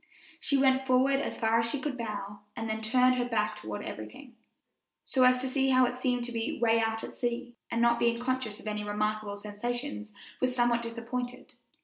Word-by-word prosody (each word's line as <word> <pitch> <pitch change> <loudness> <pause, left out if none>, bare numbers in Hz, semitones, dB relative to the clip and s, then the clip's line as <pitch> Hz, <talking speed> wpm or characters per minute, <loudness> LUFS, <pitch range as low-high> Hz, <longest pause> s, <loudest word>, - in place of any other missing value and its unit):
She 280 - +2
went 265 0 +3
forward 265 +2 +4
as - - -3
far 225 0 +3
as 230 0 +1
she 285 - -2
could 290 +2 -2
to 255 - -9
the - - -2
bow, 205 -1 -5 0.2
and 225 -2 -3
then 220 0 -2
turned 250 +3 +4
her 245 - +1
back 215 -2 +1
toward 105 - -6
everything, 235 - -8 0.7
so 260 - 0
as 255 0 +6
to 260 +1 -2
see 270 0 +1
how 255 -1 +6
it 245 - -1
seemed 250 -1 0
to 240 - -4
be 230 -1 -2
way 230 -1 +4
out 225 0 0
at - - -7
sea; 240 0 -3
and 235 0 +1
not 235 0 +4
being 235 0 +2
conscious 245 -3 -2
of - - -14
any 210 -1 -2
remarkable 210 0 -1
sensations, 220 +3 -4 0.3
was 255 -1 +1
somewhat 240 -1 +3
disappointed. 245 +2 -5
235 Hz, 215 wpm, -30 LUFS, 220-255 Hz, 0.7 s, as